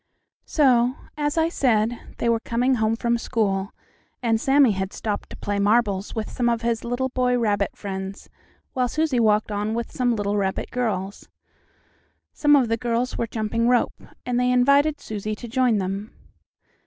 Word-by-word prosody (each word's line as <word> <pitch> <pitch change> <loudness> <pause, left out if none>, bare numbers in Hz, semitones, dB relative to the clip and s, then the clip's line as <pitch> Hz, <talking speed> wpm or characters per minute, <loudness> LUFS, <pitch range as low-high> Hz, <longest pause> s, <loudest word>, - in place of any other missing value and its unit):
So, 255 -4 +3 0.2
as 295 +1 -1
I 320 0 +3
said, 240 -7 +1 0.2
they - - -1
were 230 -1 +2
coming 245 +3 0
home 220 +1 +2
from 235 +1 0
school, 200 -4 -1 0.5
and 225 -2 +1
Sammie 270 -3 +5
had 190 0 -3
stopped 210 -2 -4
to - - -9
play 205 0 -2
marbles 205 -1 +1
with 220 -1 -2
some 240 -2 0
of 235 0 -1
his 230 -1 0
little 245 +2 -1
boy 250 -1 +1
rabbit 205 -4 0
friends, 195 0 -6 0.5
while 250 -1 +1
Susie 300 -2 0
walked 215 -1 +2
on 210 +2 -2
with 235 0 -4
some 245 -2 0
little 205 -1 -1
rabbit 190 -1 -2
girls. 205 -6 -3 1.0
Some 295 -1 +4
of 265 -4 +3
the 230 0 0
girls 240 +1 -1
were 230 - 0
jumping 225 +1 -1
rope, 245 0 +1 0.2
and 245 -1 0
they 250 0 +2
invited 280 +4 +3
Susie 215 0 -4
to 240 - -9
join 245 -1 +2
them. 195 +2 -3
230 Hz, 170 wpm, -23 LUFS, 210-250 Hz, 1.0 s, Sammie